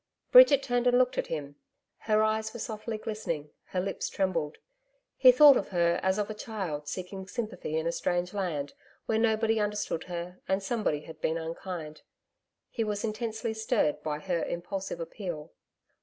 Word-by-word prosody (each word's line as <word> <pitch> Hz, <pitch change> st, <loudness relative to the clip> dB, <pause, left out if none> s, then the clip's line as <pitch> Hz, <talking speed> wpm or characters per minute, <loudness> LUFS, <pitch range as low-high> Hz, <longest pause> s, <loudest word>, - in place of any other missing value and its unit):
Bridget -, -, +8 dB
turned 245 Hz, 0 st, +1 dB
and 245 Hz, 0 st, +5 dB
looked 250 Hz, 0 st, +2 dB
at -, -, -1 dB
him. 145 Hz, -3 st, -5 dB, 0.4 s
Her 215 Hz, -1 st, +2 dB
eyes 220 Hz, 0 st, 0 dB
were -, -, -5 dB
softly 220 Hz, +1 st, -4 dB
glistening, 175 Hz, -9 st, -4 dB
her 185 Hz, -, -3 dB
lips 190 Hz, +2 st, -2 dB
trembled. 170 Hz, -6 st, -1 dB, 0.6 s
He 255 Hz, -, +8 dB
thought 280 Hz, +1 st, +8 dB
of -, -, -2 dB
her 170 Hz, -2 st, +2 dB
as 190 Hz, +1 st, +1 dB
of 210 Hz, -1 st, 0 dB
a 215 Hz, -, -5 dB
child 190 Hz, -9 st, -5 dB
seeking 190 Hz, +4 st, -6 dB
sympathy 195 Hz, -8 st, -4 dB
in 160 Hz, -, -1 dB
a 170 Hz, -, +1 dB
strange 175 Hz, +1 st, -1 dB
land, 165 Hz, -8 st, -2 dB, 0.3 s
where 220 Hz, -, +1 dB
nobody 225 Hz, 0 st, +2 dB
understood 210 Hz, -5 st, -2 dB
her 175 Hz, 0 st, -6 dB
and 190 Hz, +1 st, 0 dB
somebody 200 Hz, -9 st, -1 dB
had 155 Hz, 0 st, -12 dB
been 160 Hz, -, 0 dB
unkind. 165 Hz, -1 st, -6 dB, 0.7 s
He 225 Hz, -, -1 dB
was 210 Hz, -1 st, -2 dB
intensely 220 Hz, 0 st, -2 dB
stirred 220 Hz, -, 0 dB
by 150 Hz, -1 st, -2 dB
her 170 Hz, +2 st, -2 dB
impulsive 190 Hz, +1 st, -4 dB
appeal. 165 Hz, -3 st, -6 dB
195 Hz, 170 wpm, -29 LUFS, 165-220 Hz, 0.7 s, Bridget